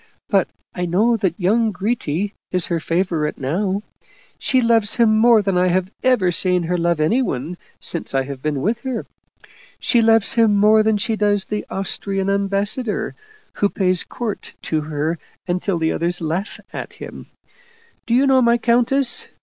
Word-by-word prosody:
But - - +2 0.2
I 180 -1 -3
know 215 +8 +2
that 190 -4 -1
young 220 +5 +2
Gritti 200 -2 -2 0.2
is 180 -2 +2
her 170 -1 -1
favorite 165 -2 -1
now; 190 +9 -2 0.6
she 260 - +2
loves 230 -3 +2
him 225 -2 +4
more 225 -1 +5
than 195 -2 +1
I 180 - +3
have 185 +1 0
ever 245 -9 +2
seen 180 0 +2
her 175 +2 -1
love 170 -2 0
anyone 160 - 0 0.2
since 170 -5 -1
I 135 - +2
have 135 -1 -8
been 145 -2 -2
with 230 +3 0
her. 255 -2 -4 0.7
She 240 - +2
loves 225 +1 +3
him 225 -4 +3
more 215 +2 +5
than 215 0 +2
she 220 +2 -1
does 205 -2 +1
the 210 0 -4
Austrian 195 0 -2
ambassador, 200 +3 -1 0.4
who 205 - +1
pays 185 -3 +1
court 230 -4 -6
to 155 -1 -1
her 155 +2 -3 0.3
until 180 +1 -1
the 160 -1 0
others 175 +1 0
laugh 170 +6 -3
at - - -6
him. - - -10 0.8
Do 235 - +2
you 265 +3 +4
know 265 -1 +4
my 235 0 +4
countess? 245 +3 +2
195 Hz, 165 wpm, -20 LUFS, 175-225 Hz, 0.8 s, more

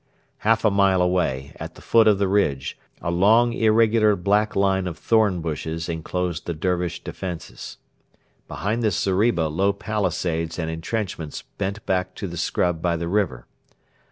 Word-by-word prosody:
Half 110 +1 +2
a 110 - +5
mile 100 -1 +3
away, 90 -7 0
at - - -8
the - - -14
foot 115 -1 +4
of 105 -2 +5
the 100 0 +1
ridge, 75 -9 0 0.3
a 85 - -1
long 110 +7 +4
irregular 110 -1 +4
black 105 +3 +1
line 95 -1 +2
of 85 - -5
thorn 105 -6 +2
bushes 80 +1 -4
enclosed 85 +1 -3
the 85 - -2
Dervish 90 +1 -2
defences. 90 -4 -7 0.7
Behind 110 +4 -2
this 105 -6 +1
zeriba 95 -3 +2
low 95 +6 +1
palisades 90 -6 -2
and 80 -2 -2
entrenchments 85 -2 -4 0.2
bent 100 +2 -3
back 90 0 -1
to 100 - -5
the 85 - -7
scrub 85 0 0
by 85 -1 +1
the 85 +1 -3
river. 85 -11 -1
95 Hz, 155 wpm, -23 LUFS, 85-105 Hz, 0.7 s, a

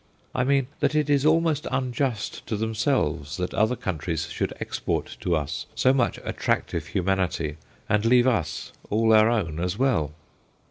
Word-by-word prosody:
I 130 - +1
mean, 135 0 +2
that - - +1
it 150 -1 +2
is 140 +1 +3
almost 160 -2 +2
unjust 125 -3 -2
to 110 - -1
themselves 105 - 0
that 90 -1 -3
other 110 +4 +2
countries 85 -6 -3
should - - -2
export - - -3
to 90 - 0
us 75 +1 -3
so 130 - +4
much 130 -3 +1
attractive - - -1
humanity 90 -5 -1 0.3
and 105 0 +2
leave 120 +1 +5
us 85 -11 0 0.2
all 110 +1 +3
our 110 +1 +6
own 85 -10 -1
as 90 +3 -1
well. 115 - +1
110 Hz, 155 wpm, -25 LUFS, 85-130 Hz, 0.3 s, our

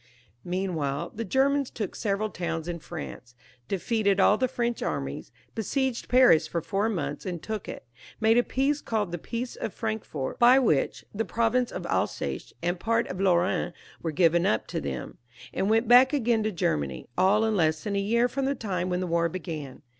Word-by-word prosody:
Meanwhile 175 -6 -2
the 230 - -4
Germans 270 +5 +2
took 210 -4 -5
several 210 0 -1
towns 165 -2 -3
in 170 -1 -4
France, 130 -7 -8 0.3
defeated 200 0 +1
aU 200 - +6
the 255 +4 +1
French 240 -1 -2
armies, - - -3 0.2
besieged 255 +3 -2
Paris 250 -10 +6
for 170 - -2
four 200 +6 -1
months 145 -8 -3
and 180 -3 -4
took 215 +4 -5
it, - - -8 0.3
made 220 +1 +4
a 240 - +6
peace 275 +4 0
called 210 -5 -1
the 175 - -4
Peace 240 +7 -5
of 220 - -5
Frankfort, 220 - -4
by 245 +2 +7
which 215 - +1
the 220 +2 -1
province 235 +2 +1
of - - -5
Alsace - - -2
and 175 +1 0
part 230 +3 +1
of 185 +1 -4
Lorraine 180 -1 +2 0.3
were 165 - -2
given 170 +2 +3
up 110 - +1
to - - -2
them, 65 -3 -5 0.3
and 195 - 0
went 225 +1 +3
back 250 +4 +7
again 235 -5 +2
to 215 0 0
Germany, 70 - -2
all 200 +4 +4
in 220 -1 +1
less 155 -4 +1
than 205 -1 -2
a - - +2
year 235 +5 +2
horn 265 +2 -2
the 280 - 0
time 185 -6 -2
when 180 0 -1
the - - -1
CONCLUSION. - - -5
461 - - -6
war 170 0 +2
began. 155 -6 -6
200 Hz, 195 wpm, -27 LUFS, 170-230 Hz, 0.3 s, by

